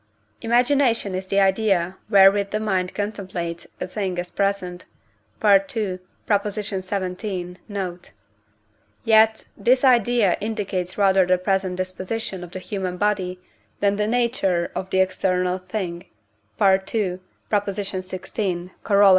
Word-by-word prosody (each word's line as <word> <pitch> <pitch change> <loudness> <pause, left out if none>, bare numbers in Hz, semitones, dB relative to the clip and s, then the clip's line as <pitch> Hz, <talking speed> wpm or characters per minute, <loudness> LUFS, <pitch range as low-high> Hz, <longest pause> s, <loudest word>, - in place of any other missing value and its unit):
Imagination 240 -3 +2
is 185 +1 -4
the 195 +1 +2
idea 190 -2 +2
wherewith 200 -1 +6
the 215 - -1
mind 190 -4 -1
contemplates 185 -5 -4
a - - -2
thing 185 -1 -3
as 175 0 -4
present 190 -3 -1 0.6
(II. 195 -1 +3 0.3
xvii. 195 -2 -2
note); 185 -3 -5 0.9
yet 220 -1 +4
this 250 +6 +2
idea 240 -6 +4
indicates 200 -4 -3
rather 190 -2 +4
the 185 0 +4
present 190 0 0
disposition 185 +1 -4
of 175 - -8
the 185 - -7
human 185 -1 -4
body 190 -2 0 0.4
than 200 0 +2
the 210 0 0
nature 225 -7 +1
of 190 - -4
the 190 - +1
external 185 -1 0
thing 185 -2 -5 0.5
(II. 190 -1 +2 0.3
xvi. 185 -2 -2
Coroll. 200 -1 +5
195 Hz, 115 wpm, -23 LUFS, 185-210 Hz, 0.9 s, wherewith